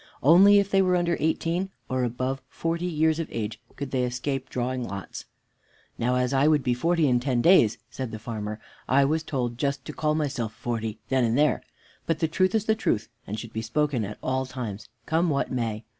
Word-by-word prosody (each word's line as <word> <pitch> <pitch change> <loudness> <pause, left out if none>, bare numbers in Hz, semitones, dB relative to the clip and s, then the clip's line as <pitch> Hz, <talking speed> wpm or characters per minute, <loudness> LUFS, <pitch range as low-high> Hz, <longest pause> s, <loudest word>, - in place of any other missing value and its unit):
Only 190 +8 +7
if 200 0 +2
they 195 - +5
were 185 -1 +3
under 175 -1 +1
eighteen 170 +4 0 0.2
or 130 -1 0
above 130 +3 -2
forty 165 +2 -2
years 160 -1 +1
of 165 - -2
age 110 -1 -4
could 140 -2 -5
they 130 - +1
escape 130 +2 -2
drawing 125 0 -2
lots. 100 -6 -6 0.7
"Now, 125 +2 +1
as 125 +1 +1
I 135 +2 +4
would 150 -3 +3
be 125 -1 +2
forty 165 +5 +2
in 125 -2 +3
ten 125 -1 0
days," 120 - +5
said 130 -2 -4
the 110 - -6
farmer, 110 -1 -5 0.3
"I 140 +2 +5
was 155 +3 +1
told 125 -6 -3
just 140 -1 -1
to - - -6
call 155 0 0
myself 135 -8 -2
forty 115 -2 -3
then 130 -1 +2
and 115 +1 +2
there; 150 +1 +3 0.5
but 165 - +1
the 160 - +1
truth 185 +5 +1
is 215 -1 +1
the 220 - +3
truth, 120 - -1 0.2
and 105 - -4
should 115 0 -9
be 110 - -2
spoken 130 +1 0
at 105 +1 -6
all 130 0 -1
times, 115 -5 -6 0.2
come 165 +2 +1
what 140 -2 0
may. 115 -3 -2
130 Hz, 210 wpm, -26 LUFS, 120-160 Hz, 0.7 s, Only